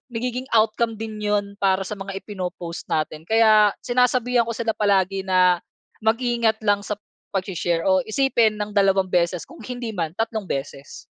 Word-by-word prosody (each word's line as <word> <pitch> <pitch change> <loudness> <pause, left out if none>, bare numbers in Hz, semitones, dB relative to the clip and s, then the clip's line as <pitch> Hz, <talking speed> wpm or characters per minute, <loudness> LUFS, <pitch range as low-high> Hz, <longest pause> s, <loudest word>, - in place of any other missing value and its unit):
nagiging 250 +2 -3
outcome 225 0 +2
din 215 -1 -6
'yon 205 -1 0
para 190 0 +3
sa - - -4
mga 195 -1 -6
ipino-post 180 -4 -6
natin 155 0 -1
kaya, 215 -2 +5
sinasabihan 250 -1 +2
ko - - -3
sila 225 0 -1
palagi 195 -2 +1
na, 180 -2 +3 0.4
mag-ingat 230 0 +1
lang 205 0 +3
sa - - -3 0.4
pag-she-share 175 -3 -1
o 190 -1 +4
isipin 235 -1 +2
ng 210 0 -2
dalawang 195 -1 +3
beses 175 0 0
kung 335 - -13
hindi 245 -2 -5
man, 165 -3 -2
tatlong 225 -1 -2
beses. 140 0 -5
210 Hz, 155 wpm, -23 LUFS, 190-225 Hz, 0.4 s, kaya